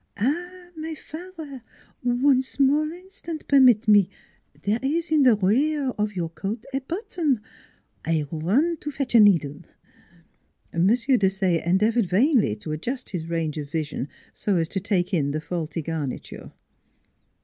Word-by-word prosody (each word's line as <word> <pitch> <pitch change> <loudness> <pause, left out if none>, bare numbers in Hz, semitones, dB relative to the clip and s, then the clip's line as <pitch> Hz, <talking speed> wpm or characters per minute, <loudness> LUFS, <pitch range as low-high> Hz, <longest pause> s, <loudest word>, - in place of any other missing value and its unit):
" - - -28
Ah, 350 - -2
my 320 0 -5
father, 315 -4 -9 0.4
one 255 +2 +3
small 280 +3 +1
instant 350 -3 -9
permit 255 -6 +5
me; 205 -3 +6 0.5
there 210 +3 +1
is 320 +5 -1
in 310 -2 +4
the 250 -4 +6
rear 265 +9 +1
of 210 -4 -2
your 170 -3 -2
coat 195 +8 -5
a 270 - +1
button 320 - -1 0.6
I 160 -2 0
run 225 - +1
to 295 - -6
fetch 275 -3 -3
a 235 - +7
needle! 170 -8 +4 0.6
" 165 - -37
M. 170 +2 +2
Desaye 195 - +2
endeavored 210 +5 +2
vainly 220 - +3
to 105 +8 -7
adjust 235 - -4
his 165 -4 -4
range 160 -2 -2
of 145 -1 -6
vision 150 -3 -3 0.3
so 205 - -1
as 165 -2 +1
to 195 - -2
take 185 -1 -1
in 145 -5 +1
the 150 +2 -2
faulty 160 0 -4
garniture. 155 -4 -5
215 Hz, 150 wpm, -24 LUFS, -, 0.6 s, a